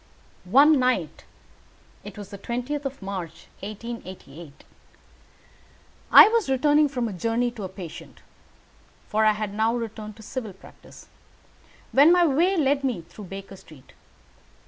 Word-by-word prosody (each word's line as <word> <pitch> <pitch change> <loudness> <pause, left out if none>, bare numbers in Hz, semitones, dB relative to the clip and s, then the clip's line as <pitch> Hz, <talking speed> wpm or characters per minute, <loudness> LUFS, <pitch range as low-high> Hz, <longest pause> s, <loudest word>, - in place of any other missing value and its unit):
One 285 +6 +6
night 220 - -1 0.8
it - - -10
was 205 -1 -10
on - - -6
the - - -24
20th 255 +5 -3
of 275 -5 -6
March, 190 -4 -6
1888 190 -8 -9 1.5
I - - +10
was 455 -8 0
returning 295 +3 +3
from 250 -4 -2
a 210 - -5
journey 230 +6 -1
to 235 - -10
a 190 - -5
patient 180 -4 -11 0.9
(for 215 +1 +1
I 215 - +5
had 210 -1 -5
now 220 +2 +1
returned 220 -2 -6
to 220 - -14
civil 225 -3 -6
practice), 190 - -16 0.8
when 290 +5 +6
my 355 -1 +5
way 340 +6 +2
led 280 -2 +1
me 245 -10 -1
through 180 +5 -12
Baker 195 +1 -9
Street. 155 -7 -17
225 Hz, 145 wpm, -24 LUFS, 195-270 Hz, 1.5 s, I